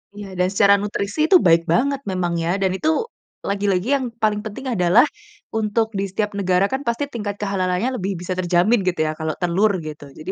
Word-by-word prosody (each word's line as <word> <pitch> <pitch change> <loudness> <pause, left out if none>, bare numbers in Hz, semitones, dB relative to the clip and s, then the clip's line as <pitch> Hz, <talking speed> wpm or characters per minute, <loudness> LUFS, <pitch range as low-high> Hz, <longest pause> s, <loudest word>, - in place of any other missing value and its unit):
Iya 205 -1 -8
dan 180 - +3
secara 200 0 +5
nutrisi 200 +2 -3
itu 375 - +5
baik 165 0 +5
banget 275 +2 +1
memang 180 -2 -1
ya, 170 - -1
dan 190 -1 +2
itu 310 - 0 0.6
lagi-lagi 200 0 0
yang 265 - -1 0.2
paling 210 -1 +2
penting 240 +6 -7
adalah 180 +1 +5 0.5
untuk 220 +1 +1
di - - 0
setiap 210 +2 -2
negara 185 0 +2
kan 265 +1 -1
pasti 235 +5 0
tingkat 205 -4 -3
kehalalannya 195 +2 0
lebih 190 +2 -2
bisa 180 +1 -3
terjamin 185 +6 +3
gitu 180 - 0
ya - - 0
kalau 160 0 -2
telur 190 +4 +2
gitu 155 -2 -8
jadi 155 - -6
200 Hz, 190 wpm, -21 LUFS, 180-215 Hz, 0.6 s, secara